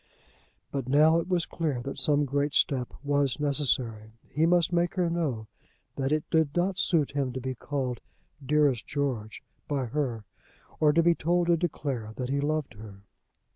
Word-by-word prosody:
But 135 -3 -3
now 155 +4 +5
it 165 - -4
was 180 -3 +1
clear 155 -7 -2
that 140 - -5
some 145 -1 +3
great 140 +1 -1
step 130 -3 +1
was 145 -2 +1
necessary. 130 -7 0 0.2
He 155 +3 +2
must 175 0 +3
make 175 0 +1
her 175 -3 +1
know 145 -10 -2 0.5
that 135 0 -1
it 155 0 0
did 160 -3 +2
not 185 +2 +1
suit 155 -6 +2
him 140 -2 -1
to 130 - -4
be 130 +1 -3
called 130 -2 -3 0.4
"dearest 140 -3 +2
George" 130 -7 -3 0.2
by 140 -3 -1
her, 120 -3 -2 0.6
or 150 -1 +5
to 165 +3 +3
be 170 +1 +5
told 175 +1 +1
to 170 - +6
declare 135 -9 -3
that 125 -1 -4
he 140 +1 0
loved 155 -2 -1
her. 105 -2 -12
145 Hz, 175 wpm, -28 LUFS, 130-160 Hz, 0.6 s, to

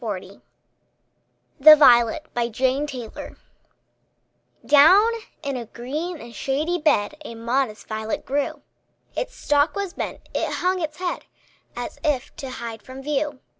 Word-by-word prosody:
MARY - - -4
HOWITT - - -16 1.2
THE 305 +3 +10
VIOLET 255 -1 +1 1.3
Down 365 +10 +7 0.3
in 280 -2 -2
a 240 -3 -5
green 300 +10 -5
and 235 -2 -11
shady 300 +9 -1
bed 210 -9 +2
A 230 - -8
modest 230 -1 -2
violet 220 0 -4
grew; 280 +1 -2 0.5
Its - - -4
stalk 290 +2 +1
was 400 -3 -3
bent, - - -6
it - - -1
hung 365 0 0
its 305 -2 -4
head, 360 -1 -3 0.5
As - - -6
if 290 -5 -1
to 270 - -6
hide 230 -3 -7
from 260 +3 -10
view. 290 -1 -2
275 Hz, 130 wpm, -23 LUFS, 240-310 Hz, 1.3 s, THE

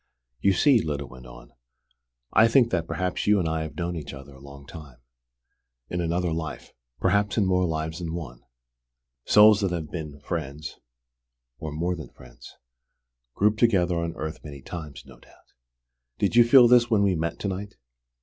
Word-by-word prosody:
"You 100 +5 +3
see," 125 +5 +4
Lyda 75 -2 -4
went 65 -1 -13
on, - - -14 0.8
"I 110 - +6
think 120 0 +3
that 85 -2 -1
perhaps 90 +2 -3
you 105 0 +5
and 90 -4 0
I 80 0 -1
have 80 -2 -6
known 85 0 -3
each 75 -3 -7
other 70 +1 -12
a 65 - -15
long 70 0 -13
time: 75 -5 -12 0.9
in 90 - -2
another 85 +1 -1
life: 80 -2 -6 0.3
perhaps 100 +3 +1
in 105 - +3
more 90 -1 +2
lives 80 +1 -3
than 85 -2 -5
one. 65 -9 -8 0.8
Souls 105 0 +6
that 100 - +1
have 80 -4 -5
been 75 -4 -7
friends 70 +4 -6 0.8
or 80 - -6
more 85 +4 -2
than 80 -4 -9
friends - - -16 0.8
group 105 +2 +1
together 90 -7 +2
on 85 0 -4
earth 80 +1 -6
many 70 -3 -10
times, 80 -5 -8
no 65 -3 -16
doubt. - - -24 0.6
Did - - 0
you 120 0 +7
feel 120 0 +7
this 120 0 +5
when 105 -3 +3
we 100 -2 +2
met 85 -1 -3
to - - -2
night?" 100 +2 -5
85 Hz, 180 wpm, -25 LUFS, 75-100 Hz, 0.9 s, you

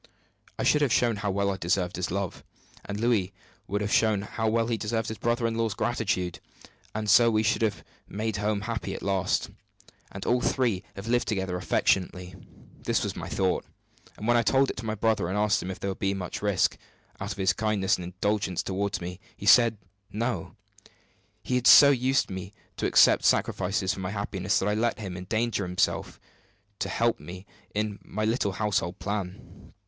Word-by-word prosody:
I - - -2
should 150 - +3
have 140 -5 +2
shown 115 -2 +2
how 100 0 -2
well 100 +1 0
I 95 - -3
deserved 90 0 0
his 90 -1 -2
love, 95 -1 -3 0.4
and 100 0 -5
Louis 110 -5 +1 0.3
would 105 +1 -1
have 105 0 -1
shown 110 -3 +3
how 110 +1 -2
well 115 +1 +2
he 115 0 0
deserved 110 0 -2
his 110 - -6
brother 120 0 0
in 115 - 0
law's 115 -3 -1
gratitude; 105 -7 -1 0.6
and 110 0 -2
so 115 +3 +6
we 110 -1 +2
should 110 0 +1
have 105 -3 0 0.2
made 110 +1 -3
home 105 0 -1
happy 115 0 -4
at - - -8
last, 95 -2 0 0.6
and 95 - -7
all 125 +1 +2
three 115 -8 0
have 100 +3 -8
lived 120 +1 +1
together 95 -3 -1
affectionately. 90 0 0 0.5
This - - 0
was - - -3
my - - -6
thought; 95 -1 0 0.5
and 110 - -5
when 120 - +4
I - - +4
told 135 +5 +3
it - - -12
to 115 - -6
my 110 - -1
brother, 110 -4 +1
and 95 +3 -2
asked 105 -1 +2
him 90 - -5
if 95 - -6
there 100 - -2
would 95 - -8
be 95 0 0
much 90 -2 -5
risk, 100 -4 +1 0.4
out - - -4
of - - -15
his 95 -2 +2
kindness 105 -3 +1
and 90 - -7
indulgence 95 +1 -1
toward 100 +1 -2
me, 90 +1 -6 0.2
he - - -8
said 115 +1 +6 0.3
'No.' 110 -3 -3 0.9
He - - -3
had 125 -1 +2
so 140 -1 +10
used 130 -3 +1
me 95 +2 -6 0.2
to - - 0
accept - - +5
sacrifices 95 0 +1
for - - -8
my 95 -1 -3
happiness 100 -1 -1
that 95 - 0
I 105 - +2
let 115 +2 0
him 95 -5 -6
endanger 110 +4 -1
himself 90 0 -1 0.6
to 95 - -2
help 115 +3 +1
me 90 +2 -9 0.3
in 105 -1 -2
my 110 +2 -3
little 110 -3 0
household 100 -3 -1
plan. 100 -3 -6
105 Hz, 195 wpm, -27 LUFS, 95-115 Hz, 0.9 s, so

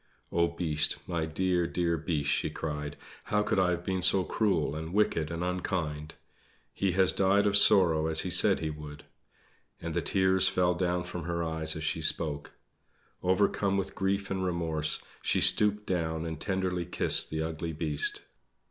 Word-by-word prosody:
"Oh, 85 0 +2
Beast; 80 -3 0
my 85 -2 -3
dear, 90 +1 0
dear 85 -1 -1
Beast!" 75 -3 -2
she - - 0
cried. 75 -2 -5 0.3
"How 105 0 0
could 95 - 0
I 90 -1 +2
have 90 0 -2
been 95 0 -2
so 95 +1 +6
cruel 90 -8 0
and 80 +4 -6
wicked 80 -7 +1
and 85 +1 -4
unkind? 80 -4 -3 0.6
He 95 -2 -1
has 95 0 +3
died 100 +1 +2
of 100 -1 +1
sorrow 90 -6 +5
as 80 0 +4
he 90 - -4
said 90 - +4
he 80 -1 -2
would!" 75 -1 -10 0.8
And - - -5
the - - -1
tears 95 -1 +3
fell 90 -1 +1
down 90 0 -1
from 90 -2 -7
her 85 -1 -2
eyes 80 -1 +1
as 80 - -5
she 80 +1 -2
spoke. 75 -2 -2 0.7
Overcome 100 +1 +1
with 95 -1 -3
grief 100 +1 -2
and 95 -1 -2
remorse, 80 -4 -2 0.2
she - - +1
stooped 105 0 +4
down 80 -3 -2
and 80 -2 -5
tenderly 95 -2 -2
kissed - - +1
the 80 0 -3
ugly 80 +1 -4
Beast. 75 -2 -1
85 Hz, 175 wpm, -29 LUFS, 80-95 Hz, 0.8 s, so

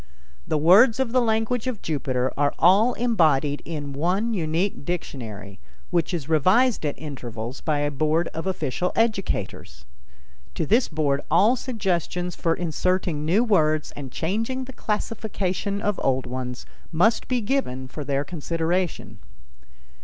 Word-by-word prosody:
The 155 - +1
words 200 - +6
of 260 -3 0
the 255 +1 +3
language 225 +1 0
of 245 -5 -4
Jupiter 130 -4 -1
are 145 0 +1
all 205 +8 +5
embodied 155 - +2
in 145 -4 -5
one 185 +10 0
unique 170 -1 -1
dictionary 110 - -6 0.3
which 170 -2 +1
is 165 -6 -3
revised 185 - +3
at 145 - -3
intervals 125 -4 -6
by 150 -2 0
a 145 0 0
board 155 +4 +1
of 160 +3 -5
official 180 -1 -1
educators; 185 - -2 0.7
to - - -1
this 230 - +3
board 145 -3 0
all 205 +10 +5
suggestions 180 - -2
for 165 -1 0
inserting 175 -2 -1
new 190 +9 +3
words 155 -9 +2
and 140 -3 -8
changing 225 - -2
the 265 - -10
classification 205 -3 -2
of 205 -2 0
old 130 -1 +1
ones 125 0 -5 0.3
must 190 +8 +2
be 250 -1 +1
given 205 - -2
for 150 +3 -7
their 140 0 0
consideration. 165 - -2
170 Hz, 140 wpm, -24 LUFS, 145-210 Hz, 0.7 s, words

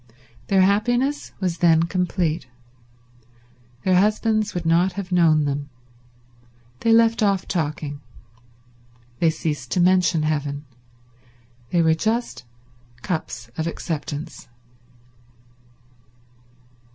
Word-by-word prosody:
Their 195 -1 +4
happiness 245 +8 +1
was 180 -3 -2
then 165 -2 +4
complete. 170 -3 -1 1.4
Their 185 -1 +4
husbands 215 +1 +1
would 175 -1 -3
not 175 +3 +3
have 190 -1 -6
known 160 -4 +4
them. 145 0 -3 1.1
They 230 - +1
left 230 0 +4
off 200 -3 +1
talking. 150 -3 -3 1.2
They 165 - +4
ceased 150 -5 -3
to - - +1
mention 180 -3 +3
heaven. 145 -1 -2 1.0
They 170 -1 +2
were 160 0 +4
just 220 - -2 0.6
cups 140 -9 -4
of 160 - -1
acceptance. 155 -3 -5
175 Hz, 95 wpm, -22 LUFS, 155-195 Hz, 1.4 s, Their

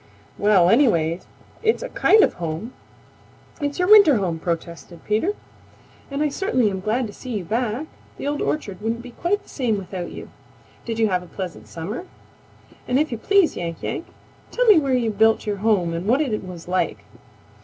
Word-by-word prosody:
"Well 205 -4 +5
anyway, 170 - +3 0.4
it's 450 +2 +1
a - - -5
kind 435 -3 +5
of - - +2
home; 170 +7 -5 0.9
it's 285 0 -2
your 360 - +1
winter 405 -9 +8
home," 180 -6 -1
protested 170 0 -5
Peter, 275 - 0 0.7
"and 280 +1 -1
I 300 - +1
certainly 255 - +1
am 190 - -3
glad 220 +6 0
to 205 - -8
see 250 -4 -5
you 195 - -4
back. 235 - -2 0.3
The - - -6
Old 290 0 -1
Orchard 205 -11 -3
wouldn't 230 +2 -2
be 250 - -10
quite 370 - -1
the - - -20
same 240 -6 -1
without 185 -2 -5
you. - - -9 0.5
Did 230 -1 -3
you 220 -1 +2
have 180 -1 +1
a 180 - -12
pleasant 185 -1 -7
summer? 205 - -6 0.8
And 250 - +2
if 300 0 +1
you 235 - -4
please, 395 - +3
Yank 170 -2 -5
Yank, - - -4 0.4
tell - - 0
me 420 -7 +7
where 275 -3 +1
you 235 -3 +1
built 220 +2 +3
your 205 -1 -2
home 195 -5 +1
and 170 +4 -4
what 250 +5 +3
it 245 -10 -1
was 180 -3 -9
like." 185 +1 -1
220 Hz, 190 wpm, -22 LUFS, 185-285 Hz, 0.9 s, winter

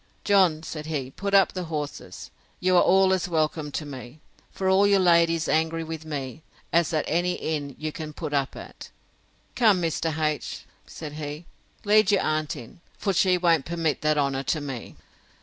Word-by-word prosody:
John, 185 -6 +3
said 155 -1 -6
he, 140 -5 -3
put 200 +6 -2
up 195 - +5
the 185 -1 -4
horses; 150 -3 -6 0.3
you 185 0 +2
are 175 - +7
all 190 +1 +4
as 185 -1 -1
welcome 155 -2 -1
to 155 - -3
me, 130 0 -9 0.3
for 190 - -3
all 190 +2 +5
your 200 0 +4
lady's 170 -3 +3
angry 160 +1 +1
with 160 -1 -7
me, 145 -2 -5 0.3
as 170 -1 +3
at 155 -2 0
any 175 +3 +1
inn 145 -5 -4
you 155 0 -4
can 155 0 -7
put 150 -1 -6
up 140 -1 0
at. - - -10 0.7
Come, 215 -6 +4
Mr. 165 -2 -1
H——, 155 -2 -2 0.2
said 150 -2 -8
he, 150 +2 -6 0.4
lead 210 0 +4
your 200 - +3
aunt 155 -1 -1
in; 120 +8 -12 0.2
for 195 - -1
she 185 0 +3
won't 170 -5 +2
permit 165 -2 -1
that 155 0 +2
honour 140 -2 0
to 155 +3 -1
me. 135 -5 -7
160 Hz, 185 wpm, -25 LUFS, 150-180 Hz, 0.7 s, are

